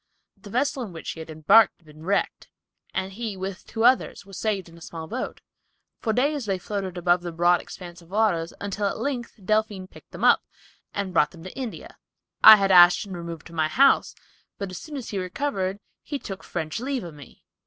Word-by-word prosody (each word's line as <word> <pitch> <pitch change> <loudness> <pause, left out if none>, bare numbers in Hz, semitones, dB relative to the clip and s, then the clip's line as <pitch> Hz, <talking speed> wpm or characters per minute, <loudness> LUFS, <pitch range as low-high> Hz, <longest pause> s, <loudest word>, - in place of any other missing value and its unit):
The 205 - -13
vessel, 265 +4 0
in 210 -7 -6
which 165 - -6
he - - -9
had 160 0 -8
embarked, 160 +9 +5
had 170 - -31
been 155 0 -15
wrecked, 200 +4 -1 0.4
and 190 0 -3
he, 215 -2 -5
with 190 0 -6
two 225 - -3
others, 250 -4 +3
were 195 - -15
saved 200 -2 -2
in 165 - -15
a 170 - -16
small 165 0 -7
boat. 235 +10 -5 0.6
For 225 - -1
days 275 +1 0
they 195 -1 0
floated 190 -1 -4
above 175 0 +2
the 175 -1 -5
broad 175 +1 +3
expanse 175 -1 -10
of 170 - -19
waters 190 -5 +1
until 200 0 -2
at - - -3
length 255 -4 -3
the 205 - -21
Delphine 215 -1 0
picked - - -17
them - - -8
up, - - +6 0.5
and 200 -2 -3
brought 150 -3 +4
them 165 -1 -14
to 185 - -9
India. 255 -4 -7 0.4
I 220 - +13
had 195 -2 +1
Ashton 180 +2 +6
removed 170 -2 -7
to 170 - -12
my 160 -1 +1
house, 270 - +4 0.4
but 200 -2 -5
as 185 - -6
soon 305 -3 -8
as 255 - -6
he 200 - -2
recovered, 190 -1 -2 0.2
he 290 - -4
took 195 -7 -8
French 160 +1 -4
leave 260 0 -2
of 170 -2 -8
me. 145 -2 -15
190 Hz, 215 wpm, -25 LUFS, 175-220 Hz, 0.6 s, I